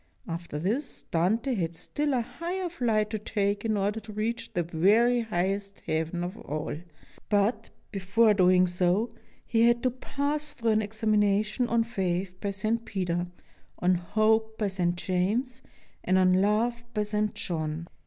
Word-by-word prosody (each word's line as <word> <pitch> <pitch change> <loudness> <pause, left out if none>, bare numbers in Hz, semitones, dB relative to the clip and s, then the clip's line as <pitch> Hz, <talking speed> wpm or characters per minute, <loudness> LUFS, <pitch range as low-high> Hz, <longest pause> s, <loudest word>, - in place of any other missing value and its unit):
After 170 -2 -5
this, 220 - -2
Dante 220 +10 +1
had 170 -6 -2
still 290 - -1
a 245 - +2
higher 350 +9 -4
flight 225 -9 0
to 215 - -2
take 205 -1 -1
in 220 -2 +1
order 205 +2 0
to 215 0 -11
reach 230 +2 -3
the 175 - +1
very 210 +9 +3
highest 200 -1 -2
Heaven 160 +2 -2
of 180 +5 -5
all, 150 +1 -4 0.5
but, 210 +2 +1 0.2
be 200 - -3
fore 210 +4 +4
doing 185 -2 +5
so, 180 +5 +1 0.3
he 225 -2 +1
had 235 +1 +2
to 255 - +2
pass 290 +4 -2
through 235 -6 -1
an 215 0 +3
examination 215 +1 +1
on 235 -1 +2
Faith 190 -5 -2
by 200 - -1
St. 215 +4 -1
Peter, 180 -4 -2 0.5
on 180 +1 +3
Hope 220 +5 +1
by 210 -2 0
St. 175 -2 0
James, 210 +9 -1 0.4
and 185 +1 +3
on 185 -1 +5
Love 215 +5 +2
by 210 - +2
St. 210 0 -1
John. 160 -1 -3
210 Hz, 160 wpm, -28 LUFS, 185-230 Hz, 0.5 s, doing